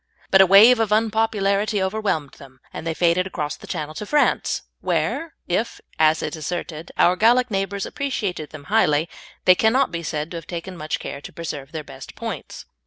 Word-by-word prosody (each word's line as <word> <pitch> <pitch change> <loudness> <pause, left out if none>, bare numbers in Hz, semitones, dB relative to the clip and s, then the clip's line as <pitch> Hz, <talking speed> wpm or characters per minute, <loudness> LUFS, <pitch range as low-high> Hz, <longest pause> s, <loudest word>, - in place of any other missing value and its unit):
But 190 - +7
a 190 - +6
wave 220 +6 +8
of 220 -2 0
unpopularity 215 -1 +1
overwhelmed 190 -7 -1
them, 130 -1 -15
and 165 - -6
they 165 - -1
faded 175 +2 +2
across 150 -5 -4
the - - -14
Channel 155 0 -4
to 210 - -6
France, 295 +3 +1 0.2
where, 330 0 -1
if, 210 +6 -1 0.2
as 155 0 +4
is 150 - -3
asserted, 160 0 -5
our 180 - +4
Gallic 240 +4 +3
neighbours 195 0 -2
appreciated 205 - -3
them 155 -2 -10
highly, 155 -8 +3 0.4
they 185 - +8
cannot 230 +6 +2
be 170 0 -3
said 155 0 -4
to 170 - -5
have 165 - -9
taken 175 +2 -6
much 155 -2 -3
care 140 - -7
to - - -10
preserve 150 -4 -6
their 160 -2 -5
best 135 -2 -11
points. - - -6
180 Hz, 185 wpm, -22 LUFS, 155-215 Hz, 0.4 s, wave